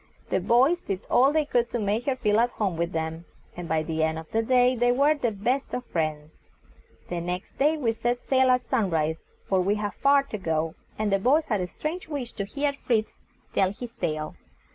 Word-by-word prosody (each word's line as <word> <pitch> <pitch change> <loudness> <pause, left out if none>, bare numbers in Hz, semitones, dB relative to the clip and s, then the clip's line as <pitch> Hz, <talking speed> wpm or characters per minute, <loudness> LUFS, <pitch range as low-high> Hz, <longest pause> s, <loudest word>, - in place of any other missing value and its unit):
The - - +2
boys 265 +9 +3
did 195 -1 -3
all 265 +3 +5
they 310 0 +2
could 240 -4 +1
to - - -2
make 215 +3 -1
her 270 - +2
feel 210 -4 +2
at 240 +1 +3
home 200 -7 -2
with 170 +1 -1
them, 160 0 -3 0.3
and 175 -1 -7
by 160 0 +1
the 160 0 -2
end 160 0 +1
of 160 0 -9
the 225 - +2
day 250 +2 +3
they 245 0 +3
were 280 +5 +4
the 275 -6 -1
best 245 +7 -1
of 250 0 -4
friends. 155 -2 -3 0.8
The 175 -1 -2
next 180 +2 -5
day 300 +3 +3
we 245 -6 +1
set 240 +2 -1
sail 260 -1 +3
at 250 -1 +3
sun 230 -6 +1
rise; 160 -1 0 0.3
for 190 -1 +2
we 200 +3 +1
had 205 -2 -3
far 280 +4 +4
to 220 -6 -6
go, 160 -3 -1 0.2
and 215 -1 0
the 195 - +3
boys 285 +9 +3
had 210 -8 0
a 180 - -2
strange 320 - -5
wish 280 -6 -4
to 200 - -4
hear 280 +7 -1
Fritz 230 -5 -1 0.4
tell 190 -1 +2
his 235 +3 -8
tale. 155 -5 -3
220 Hz, 225 wpm, -26 LUFS, 175-255 Hz, 0.8 s, all